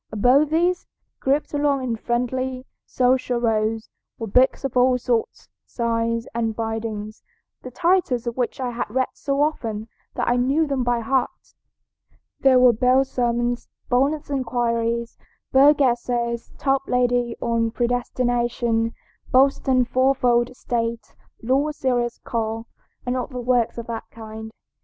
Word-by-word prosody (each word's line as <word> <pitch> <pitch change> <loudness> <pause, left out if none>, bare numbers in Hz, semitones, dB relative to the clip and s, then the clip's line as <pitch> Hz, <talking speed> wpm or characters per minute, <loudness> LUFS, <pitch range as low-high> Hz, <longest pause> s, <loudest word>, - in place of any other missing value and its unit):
Above 255 +8 +4
these, 350 +3 +1 0.3
grouped 280 +3 0
along 285 -2 +1
in 240 -3 -1
friendly, 255 +3 -2 0.2
social 250 -1 +1
rows, 225 -1 0 0.3
were 225 - -4
books 250 +7 +3
of 270 -2 -3
all 250 0 +4
sorts, 240 -2 -2 0.2
sizes, 230 -1 -1
and 225 -1 -1
bindings, 220 -1 -4 0.4
the 255 - -8
titles 335 -4 +1
of 235 -1 -3
which 250 0 -2
I 250 -2 -2
had 240 -1 -4
read 260 +4 0
so 280 +1 0
often 225 -8 -2 0.3
that - - -1
I 240 - +3
knew 275 +6 +2
them 275 -3 -1
by 240 -1 0
heart. 260 +3 -2 0.9
There 265 -1 +5
were 250 -1 +6
Bell's 255 +4 +2
Sermons, 240 0 -1 0.2
Bonnett's 290 +4 +1
Inquiries, 235 -3 -1 0.3
Bogue's 285 +2 +6
Essays, 240 -2 0
Toplady 250 -3 +1
on 230 -1 0
Predestination, 240 -1 0 0.4
Boston's 260 -1 +3
Fourfold 250 -1 +2
State, 230 -2 -3 0.3
Law's 280 +5 +1
Serious 245 -2 0
Call, 225 -1 -3 0.4
and 250 0 -1
other 255 0 -4
works 245 -2 +1
of 235 - -5
that 230 -1 -5
kind. 220 0 -9
245 Hz, 130 wpm, -23 LUFS, 230-260 Hz, 0.9 s, were